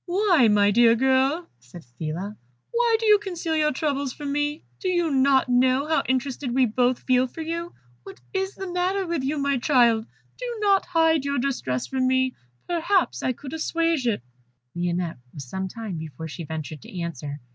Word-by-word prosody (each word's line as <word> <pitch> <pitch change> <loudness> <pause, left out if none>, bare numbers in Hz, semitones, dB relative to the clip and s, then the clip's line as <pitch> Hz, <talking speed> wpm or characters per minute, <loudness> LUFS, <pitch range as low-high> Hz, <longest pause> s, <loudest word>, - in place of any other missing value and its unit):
"Why, 355 - +4
my 205 -1 +4
dear 230 +1 +5
girl," 265 +6 +2
said 125 +7 -13
Phila, 175 +7 -4 0.4
"why 470 -1 +3
do 450 - -2
you 420 -1 +6
conceal 350 -5 -3
your 305 -1 +2
troubles 280 -2 -1
from 290 -2 -5
me? 295 +2 -1 0.2
Do 380 - -3
you 345 -3 +1
not 270 -1 +3
know 255 +2 +3
how 320 0 +2
interested 260 -1 -1
we 260 -1 +5
both 245 +2 +1
feel 255 0 +3
for 320 - -9
you? 335 +2 -4 0.3
What 195 - -12
is 385 0 -2
the 385 - -6
matter 370 +2 0
with 335 -4 -2
you, 285 +3 -1
my 280 -2 +1
child? 235 -5 +3 0.3
Do - - -4
not 400 -2 +3
hide 325 -4 +3
your 280 0 -1
distress 245 - -1
from 260 -1 0
me; 260 0 +2 0.3
perhaps 350 +2 +1
I 255 - +1
could 265 +3 -8
assuage 330 -3 0
it." 210 - 0 0.5
Lionette 175 -3 -2 0.2
was 140 -3 -7
some 190 +7 -3
time 210 -2 -6
before 160 +1 -7
she 165 +1 -7
ventured 155 -1 -6
to 180 - -8
answer. 150 -4 -5
265 Hz, 185 wpm, -24 LUFS, 220-330 Hz, 0.5 s, you